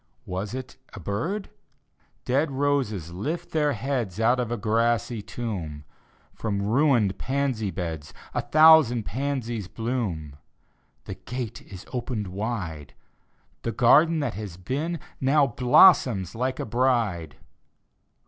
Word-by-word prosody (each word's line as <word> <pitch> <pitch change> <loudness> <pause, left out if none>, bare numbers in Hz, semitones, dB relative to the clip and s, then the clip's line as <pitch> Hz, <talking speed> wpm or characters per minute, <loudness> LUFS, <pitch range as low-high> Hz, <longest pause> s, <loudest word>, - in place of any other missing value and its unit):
Was 95 +5 -4
it 130 -1 -7 0.2
a 110 - -8
bird? 160 - -3 0.7
Dead 140 +5 +1
roses 135 - -1
lift 160 - -4
tlieir 150 -3 +2
heads 120 -8 -3
Out 120 +3 +3
of 120 -2 -2
a 120 - -1
grassy 115 0 0
tomb; 100 -10 -5 0.5
From 105 -3 -3
mined 110 -1 +2
pansy 130 -6 -1
beds 80 -4 -5 0.2
A - - 0
thousand 155 -7 +6
pansies 120 -4 -3
bloom. 95 - -3 0.7
The - - -5
gate 120 -2 -6
is 95 -1 -9
opened 120 -5 -3
wide— 90 - -5 0.7
Tlie 115 - -4
garden 155 +6 +5
that 145 - -2
has 100 -3 -7
been 145 - -3 0.2
Now 140 +2 +4
blossoms 125 - +5
like 130 +3 -2
a - - -2
bride 110 - 0
120 Hz, 120 wpm, -25 LUFS, 100-135 Hz, 0.7 s, thousand